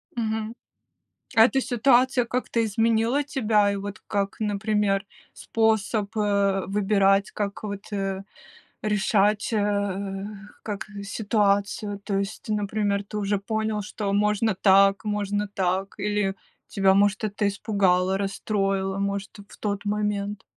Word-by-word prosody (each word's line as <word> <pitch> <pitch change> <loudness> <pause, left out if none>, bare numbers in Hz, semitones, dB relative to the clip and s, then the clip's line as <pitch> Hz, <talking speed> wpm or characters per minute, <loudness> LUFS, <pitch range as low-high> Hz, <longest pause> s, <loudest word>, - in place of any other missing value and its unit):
Мгм. 220 -1 -2 0.8
А 225 - +8
эта 270 +2 +1
ситуация 250 +1 +3
как-то 235 -1 -1
изменила 225 +5 +1
тебя, 215 -8 +2
и - - -2
вот 200 +1 -6
как, 200 -1 -1
например, 210 -1 0 0.3
способ, 220 -2 0
э, 200 -2 +2
выбирать, 195 0 +2
как 200 0 -4
вот, 200 0 -6
э, 195 -1 -2 0.6
решать, 210 0 +1
э, 200 -2 -1 0.4
как 205 -2 -5 0.2
ситуацию, 205 -1 0
то 200 -2 -1
есть, 200 +2 -5
например, 205 -1 0
ты 210 - -8
уже 205 0 0
понял, 220 +1 -2
что 205 0 -3
можно 210 +1 +2
так, 195 +2 +4
можно 205 -1 -1
так, 190 0 -1
или 205 -1 0 0.3
тебя, 195 -1 +3
может, 205 +2 +2
это 205 0 -1
испугало, 195 -2 +1
расстроило, 195 -1 -1
может, 200 0 -2 0.2
в - - -14
тот 205 -1 -3
момент. 205 -1 -2
205 Hz, 125 wpm, -25 LUFS, 195-215 Hz, 0.8 s, А